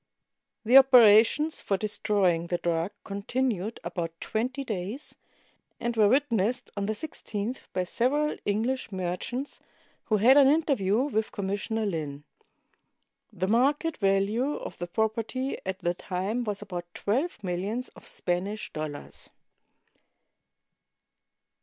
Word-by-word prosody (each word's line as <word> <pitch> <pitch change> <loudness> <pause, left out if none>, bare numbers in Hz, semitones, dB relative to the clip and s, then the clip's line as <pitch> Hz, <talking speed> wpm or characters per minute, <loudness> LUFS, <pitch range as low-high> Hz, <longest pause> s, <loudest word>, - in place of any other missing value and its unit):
The 245 +4 +7
operations 255 +3 +6
for 195 - 0
destroying 190 -5 +1
the 175 - 0
drug 170 0 -1
continued 215 +1 -2
about 165 -2 -4
twenty 255 +5 -2
days, 215 +3 -4 0.7
and 235 0 -2
were 215 -2 +5
witnessed 245 -2 +1
on 200 -1 -2
the 215 - 0
i6th 225 -3 -5
by 185 - 0
several 285 +10 0
English 225 +5 -1
merchants, 190 +9 -4 0.5
who 215 - +2
had 250 +7 +6
an 280 -2 +7
interview 270 -9 +2
with 220 -6 -1
Commissioner 205 +3 -2
Lin. 150 -6 -3 1.1
The 185 -3 -2
market 280 - +2
value 205 +8 +1
of - - -7
the 175 - -3
property 225 +7 -2
at 190 0 -2
the 175 -2 -1
time 195 +7 -3
was 205 -2 -3
about 175 -2 -7
twelve 255 +4 -1
millions 195 +7 -2
of - - -16
Spanish 195 +4 -3
dollars. 155 -2 -6
215 Hz, 120 wpm, -28 LUFS, 185-250 Hz, 1.1 s, The